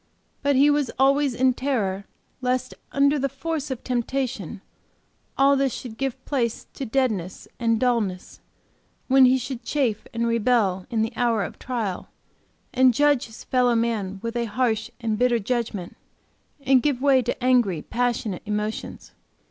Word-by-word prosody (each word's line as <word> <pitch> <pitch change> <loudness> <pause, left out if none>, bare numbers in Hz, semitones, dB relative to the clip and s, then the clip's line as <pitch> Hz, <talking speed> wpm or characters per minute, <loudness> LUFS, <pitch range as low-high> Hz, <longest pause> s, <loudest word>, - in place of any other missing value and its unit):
But 285 0 +2
he 285 +3 +5
was 290 -4 +1
always 275 0 +3
in 255 +1 +3
terror, 210 -8 -1 0.4
lest 255 0 -1 0.2
under 280 +1 +3
the 275 +1 0
force 300 +2 -4
of 260 -2 -5
temptation, 240 - -2 0.8
all 275 +1 +5
this 275 -1 +1
should 235 -4 -8
give 265 +1 -4
place 240 -5 -1
to 270 - -5
deadness 220 -8 -1
and 230 -2 +1
dullness, 225 -7 -1 0.7
when 265 0 +6
he 255 +1 +5
should 250 -1 -5
chafe 235 -4 -1
and 235 -1 -1
rebel 225 -5 +1
in 225 -3 0
the 225 - -3
hour 230 -4 +1
of - - -7
trial, 225 -8 -3 0.6
and 255 -2 +4
judge 290 -3 +3
his 225 - -12
fellow 250 -2 +2
man 220 -4 -1
with 230 +1 -4
a 235 -1 0
harsh 225 0 -1
and 220 -3 -2
bitter 245 -1 +3
judgment, 215 -5 -3 0.7
and 265 -2 +4
give 285 -3 0
way 270 -1 +4
to 245 +1 -4
angry, 240 -11 +2
passionate 235 -5 -1
emotions. 210 +1 -4
245 Hz, 155 wpm, -24 LUFS, 220-265 Hz, 0.8 s, when